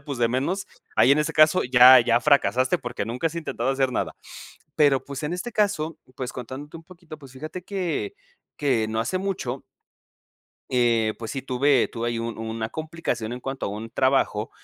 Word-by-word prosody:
y 140 - -26
pues, 140 -4 -5
de 115 -1 +2
menos 145 - -1 0.3
ahí 130 - +6
en 145 - +3
ese 150 - -1
caso, 155 +3 +5
ya 125 +1 +8
ya 120 0 +2
fracasaste, 140 +2 +2
porque, 120 -5 -4
nunca 125 +8 -1
has 165 - -12
intentado 135 -6 -2
hacer 135 -1 0
nada. - - -2 0.6
Pero, 140 -3 +3
pues, 140 +1 -7
en 155 +4 -2
este 235 +7 -5
caso, 195 -7 0 0.2
pues, 130 -1 -5
contándote 130 +6 -8
un 165 - -14
poquito, 170 -3 -13
pues, 135 -4 -14
fíjate 155 +6 -7
que 195 - -3 0.4
que 125 -7 +1
no 110 0 -2
hace 135 +11 -1
mucho 180 -10 -3 1.1
eh, 115 -3 +2
pues, 115 -1 -6
sí 135 - -4
tuve 135 0 +2
tuve 120 0 -3
ahí 115 - -2
un 115 0 -4
una 110 0 -4
complicación 155 -6 -4
en 125 - -6
cuanto 135 +1 -4
a - - -2
un 110 +2 -7
trabajo. 130 -4 +1
135 Hz, 195 wpm, -24 LUFS, 120-155 Hz, 1.1 s, ya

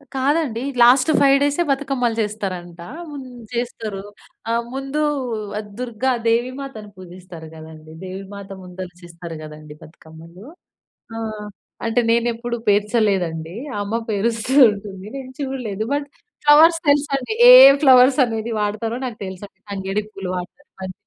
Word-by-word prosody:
కాదండి. 270 -3 0 0.2
లాస్ట్ 255 +5 +6
5 275 -1 +5
డేసే 290 +4 +1
బతుకమ్మలు 270 -4 -1
చేస్తారంట 185 -5 -5 0.3
హ్మ్. 280 -3 -8 0.3
చేస్తారు. 225 -4 -4 0.5
ఆహ్, 235 0 0
ముందు 275 +3 -3 0.8
దుర్గ 245 -2 -7 0.2
దేవి 235 +2 +1
మాతను 225 -7 -8
పూజిస్తారు 180 -2 -11
కదండీ. 155 0 -12
దేవి 190 +1 -7
మాత 200 -1 -10
ముందల 180 0 -8
చేస్తారు 170 -1 -9
కదండీ 150 0 -11
బతుకమ్మలు. 165 +5 -15 0.7
ఆహ్, 215 -2 -5 0.4
అంటే 225 +2 +2
నేను 235 +1 +2
ఎప్పుడు 235 +1 -4
పేర్చలేదండి. 200 -5 0 0.3
అమ్మ 205 +3 -4 0.2
పేరుస్తూ 225 +4 -1 0.2
ఉంటుంది. 200 -2 -8
నేను 260 -1 -8
చూడలేదు 240 -6 -4
బట్ 285 0 -2 0.4
ఫ్లవర్స్ 320 +3 +6
తెలుసండి 285 +2 +1 0.2
ఏ - - +12 0.3
ఫ్లవర్స్ 260 0 +6
అనేది 225 0 -4
వాడతారో 215 +3 -2
నాకు 235 -3 -7
తెలుసండి. 190 +1 -10
తంగేడి 195 +1 -3
పూలు 195 -1 -7
వాడుతారు 180 +11 -9
బంతి 185 0 -6
220 Hz, 125 wpm, -20 LUFS, 185-255 Hz, 0.8 s, ఏ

